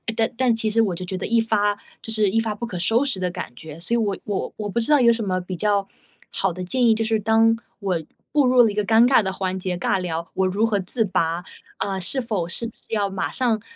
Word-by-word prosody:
但 225 0 +1
但 250 -3 +3
其 225 -1 0
实 225 +2 +3
我 195 -5 0
就 185 - -6
觉 185 +1 -4
得 - - -4
一 230 +1 +2
发 205 -2 +1 0.3
就 225 - -7
是 215 -3 +2
一 225 - +2
发 225 -1 -1
不 235 - -4
可 185 - -5
收 225 +8 +2
拾 255 -9 -2
的 180 -1 0
感 180 - -6
觉， 160 +3 -10
所 205 +7 -2
以 - - +4
我 205 -4 0
我 205 -3 -3
我 210 -1 -4
不 235 - -1
知 235 +6 -1
道 295 - +6
有 235 -1 +6
什 230 -1 -2
么 185 -1 0
比 180 0 -6
较 200 +1 +1 0.4
好 195 - 0
的 185 +1 -6
建 245 +7 0
议， 225 - +6
就 225 - 0
是 220 -1 +1
当 225 +2 +3 0.2
我 185 -5 -1 0.3
步 290 -2 +4
入 250 -1 +6
了 225 - +4
一 - - -7
个 210 - 0
尴 225 +2 +5
尬 260 -2 +5
的 190 - -1
环 190 -1 -3
节， 185 -1 -3
尬 175 - +1
聊， 170 -2 -3
我 190 - +1
如 200 +4 +1
何 220 -2 +1
自 220 +4 +1
拔？ 170 -2 0 0.3
呃， 195 -1 -2
是 260 +9 -1
否 210 -8 -2
是 230 +7 -3 0.2
要 205 -3 0
马 195 0 -2
上， 230 -5 0
210 Hz, 290 characters per minute, -23 LUFS, 185-225 Hz, 0.4 s, 道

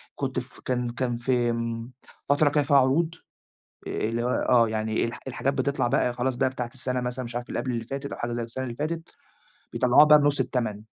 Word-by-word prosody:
كنت 130 -2 -2
ف 125 +1 -10
كان 125 -1 -2
كان 120 0 -2
في 120 0 +1
امم، 115 0 -3 0.3
فترة 145 +1 +3
كان 145 0 +2
فيها 140 0 +4
عروض، 155 +6 +2 0.7
آآ، - - -4
اللي 115 +2 -1
هي - - -1 0.2
آه، 120 -2 +5
يعني 110 0 -1
الح 115 +1 -4
الحاجات 135 +2 -1
بتطلع 140 -3 0
بقى 125 0 +2
خلاص 125 +1 -1
بقى 120 - +2
بتاعة 125 -2 -5
السنة 125 0 -2
مثلًا 125 +1 -3
مش 120 0 -7
عارف 120 0 -3
قبل 130 - -2
اللي 115 -1 -3
فاتت 135 +3 -5
أو - - -6
حاجة 120 0 -3
زي 120 0 -2
السنة 120 +3 -5
اللي 120 -2 -5
فاتت، 165 +3 -3 0.6
بيطلعوها 125 +4 +6
بقى 150 0 +7
بنُص 145 -1 +2
التمن، 110 -5 -1
125 Hz, 215 wpm, -26 LUFS, 120-135 Hz, 0.7 s, بقى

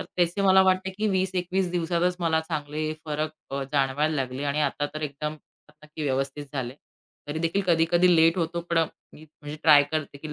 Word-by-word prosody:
तर - - -4
तसे 175 +3 +1
मला 190 0 +6
वाटते 190 0 +2
की 210 +3 -2
20 190 -1 +1
21 180 0 -1
दिवसातच 175 +1 0
मला 160 -1 +2
चांगले 155 -1 -3
फरक 155 0 -2 0.2
अ, 140 0 -2
जाणवायला 145 +3 +1
लागले 130 0 -3
आणि 145 +1 0
आता 145 0 0
तर 155 - -5
एकदम 150 +1 -4 0.5
नक्की 155 0 -8
व्यवस्थित 135 +1 -2
झाले. 130 -2 -4 0.5
तरी 150 - -3
देखील 165 +5 0
कधी-कधी 175 +1 +4
लेट 165 +2 +4
होतो 170 0 -1
पण 170 - +3 0.3
मी 155 - -14
म्हणजे 150 0 -10
ट्राय 150 -2 +7
करते 150 -2 -3
की 150 +1 -7
155 Hz, 185 wpm, -26 LUFS, 145-175 Hz, 0.5 s, ट्राय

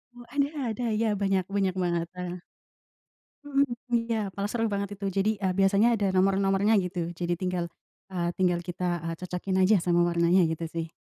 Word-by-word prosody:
Wah 240 - -12
ada 280 0 +2 0.2
ada 230 +3 -4 0.2
ya 225 - +2
banyak, 195 -1 +2
banyak 190 -2 +1
banget, 170 -1 0
heeh. 180 0 -5 1.1
Mhm, 280 -1 +3 0.3
iya 230 -1 +1 0.2
malah 200 +2 -3
seru 230 0 0
banget 200 0 -2
itu. 200 - -5
Jadi, 210 +3 +3
eee, 190 -2 0
biasanya 200 +5 +4
ada 200 -2 0
nomor-nomornya 195 +2 +3
gitu. 175 -2 -3
Jadi 175 0 -2
tinggal, 180 -2 -1 0.4
eee, 175 -2 -1
tinggal 180 -2 +2
kita, 175 -2 -2
eee, 165 0 -2
cocokin 185 +1 -3
aja 195 +4 +5
sama 175 0 +2
warnanya 170 +2 +3
gitu 160 +1 -3
sih. 165 0 -4
185 Hz, 175 wpm, -27 LUFS, 175-200 Hz, 1.1 s, aja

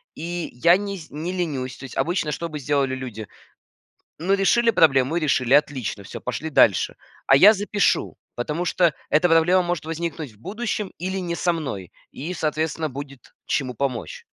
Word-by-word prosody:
и 175 +1 -4
я 170 +9 +5
не 200 0 -4
сь 160 -3 -11
не 160 +5 -4
ленюсь. 140 -8 -3
То - - -12
есть 135 - -9
обычно 170 -3 0
что 170 +4 -3
бы 155 -2 -6
сделали 135 -1 0
люди? 115 -5 -7 0.9
Ну, 185 +5 +1
решили 230 +4 +3
проблему 135 - +3
и 175 - +1
решили. 135 -3 +2
Отлично 130 -8 +1
всё, - - -8
пошли 125 +6 -4
дальше. 100 - +3 0.3
А 135 - +7
я 200 +9 +9
запишу, 205 -1 0 0.2
потому 150 +8 -2
что 175 -2 +2 0.2
эта 165 +4 +3
проблема 170 +3 +4
может 175 -3 -2
возникнуть 165 -4 -4
в 105 - -23
будущем 210 - -3
или 190 +3 -3
не 170 -2 -3
со 175 - +1
мной, 105 - -5 0.2
и, 165 +7 -6
соответственно, 155 0 -1
будет 140 -1 -9
чему 130 -3 -1
помочь. 140 - -3
160 Hz, 175 wpm, -23 LUFS, 135-180 Hz, 0.9 s, я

